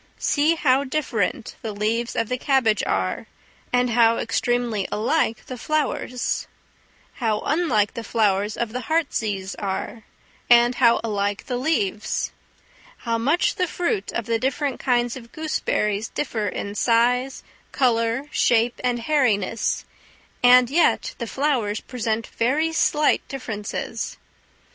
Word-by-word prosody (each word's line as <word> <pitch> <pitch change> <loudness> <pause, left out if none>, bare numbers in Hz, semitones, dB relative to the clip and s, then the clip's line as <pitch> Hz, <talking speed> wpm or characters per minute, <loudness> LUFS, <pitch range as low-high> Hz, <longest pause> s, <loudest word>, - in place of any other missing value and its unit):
See 305 +3 +2
how 275 -3 +3
different 255 -6 -2
the 220 -2 -4
leaves 225 +3 -1
of 230 - 0
the 250 +1 -2
cabbage 255 -7 +2
are, - - -1 0.4
and 245 -1 +2
how 230 0 +4
extremely 235 -2 0
alike 230 +1 0
the 255 -2 -7
flowers; 290 -4 -1 0.7
how 220 -3 +1
unlike 270 -11 +1
the 230 - -5
flowers 210 -2 +1
of 235 -2 -2
the 250 - -2
heartsease 215 - -1
are, 200 +3 -4 0.5
and 240 0 +6
how 235 -3 +4
alike 205 -2 -2
the 250 - -2
leaves; 230 -7 -1 0.7
how 230 -1 0
much 290 +10 +1
the 365 - +1
fruit 335 - -2
of 235 - -3
the 230 0 0
different 270 +1 -1
kinds 240 -2 +1
of 235 -3 -11
gooseberries 220 -9 -1
differ 220 -7 -3
in 200 +1 -4
size, 245 +4 +1 0.3
colour, 230 0 +1
shape, 235 0 +2
and 245 -1 0
hairiness, 230 -7 +1 0.6
and 245 0 +6
yet 335 +4 +2
the 235 - -3
flowers 245 -6 0
present 230 -3 -3
very 300 +8 0
slight 300 -1 +2
differences. 225 -6 -5
235 Hz, 130 wpm, -23 LUFS, 220-265 Hz, 0.7 s, and